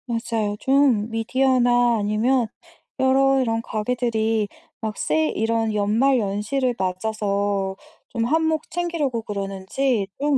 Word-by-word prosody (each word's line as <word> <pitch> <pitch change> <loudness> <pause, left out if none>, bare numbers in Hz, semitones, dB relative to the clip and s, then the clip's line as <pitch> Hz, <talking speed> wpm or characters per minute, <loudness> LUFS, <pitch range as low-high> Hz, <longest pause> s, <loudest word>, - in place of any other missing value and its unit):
맞아요. 230 -3 -2
좀 265 -6 +3
미디어나 245 0 +2
아니면 225 +4 +1 0.5
여러 270 +1 +4
이런 225 -2 0
가게들이 225 -1 -1 0.3
막 220 -2 -4
세일 155 0 0
이런 225 0 0
연말연시를 225 +3 +1
맞아서 200 0 -1 0.3
좀 230 -3 -1
한몫 320 +3 +1
챙기려고 325 -9 -1
그러는지 200 +3 -2
좀 290 0 +2
230 Hz, 255 characters per minute, -23 LUFS, 210-260 Hz, 0.5 s, 여러